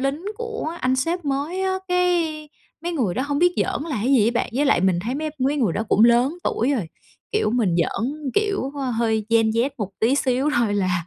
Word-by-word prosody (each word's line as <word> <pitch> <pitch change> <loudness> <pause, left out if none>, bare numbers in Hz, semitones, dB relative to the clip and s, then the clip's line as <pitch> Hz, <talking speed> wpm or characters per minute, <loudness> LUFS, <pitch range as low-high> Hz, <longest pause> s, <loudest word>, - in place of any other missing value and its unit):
lính 275 +6 -2
của 460 -8 -4
anh 255 +1 +1
sếp 330 +5 -1
mới 290 +7 -2
á, 380 - +1 0.2
cái 340 -4 0 0.3
mấy 345 0 -2
người 230 - 0
đó 255 - -1
hông 285 +1 -1
biết 355 +1 +4
giỡn - - -1
là 305 -5 -3
cái 265 +3 +2
gì 220 -6 +5
á - - +1
bạn. - - -1
Với 285 +4 +2
lại 270 - +3
mình 185 -2 +2
thấy 245 +4 -3
mấy 310 +1 -3
mấy 275 +3 +1
người 225 -11 +1
đó 210 - -1
cũng 215 - +5
lớn 245 +8 +3
tuổi 245 +6 0
rồi, 210 - -2 0.4
kiểu 430 - +1
mình 220 -7 +1
giỡn, 265 - -2
kiểu, 400 -9 0 0.3
hơi 220 -2 0
Gen 225 -1 +4
Z 235 +5 +1
một 205 -3 -3
tí 230 +5 +3
xíu 270 +1 +1
thôi 225 -4 +1
là 185 -4 0
270 Hz, 230 wpm, -22 LUFS, 225-315 Hz, 0.4 s, gì